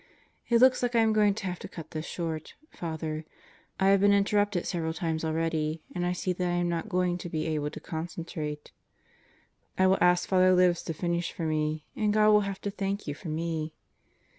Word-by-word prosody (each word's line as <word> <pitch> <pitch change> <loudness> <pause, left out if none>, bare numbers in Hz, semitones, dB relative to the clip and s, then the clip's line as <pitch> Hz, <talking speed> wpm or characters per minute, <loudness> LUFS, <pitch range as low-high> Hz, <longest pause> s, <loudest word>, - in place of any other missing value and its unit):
It 235 -1 +5
looks 260 0 +6
like 245 -1 0
I 230 - +5
am 220 -1 +3
going 210 -2 +4
to 215 - -5
have 180 -2 -3
to - - -7
cut 165 - -10
this 155 +1 -5
short, 160 -3 -4 0.2
Fr. - - -8
I 160 -1 -4 0.7
have 200 0 +5
been 205 0 +5
interrupted 205 -2 +2
several 165 -3 -2
times 160 -1 -2
already 160 -1 -1
and 175 -1 -1
I - - +1
see 180 +1 -1
that 180 0 -2
I - - 0
am 175 0 +1
not 170 +4 -2
going 180 -2 0
to 175 - -6
[be] 155 -1 -2
able 150 -2 -1
to 155 - -8
concentrate. 160 -2 -5 1.1
I 190 - +4
will 190 +1 +4
ask 180 0 +4
Fr. 190 - +1 0.2
Libs 180 -1 +4
to 165 - -3
finish 170 +1 -1
for 170 - -6
me, 155 0 -1
and 210 -1 +1
God 215 0 +5
will 210 0 +6
have 195 -1 -4
to 200 - -3
thank 200 0 -3
you 145 - -3
for 160 +3 -8
me. 160 0 -3
175 Hz, 215 wpm, -28 LUFS, 160-195 Hz, 1.1 s, looks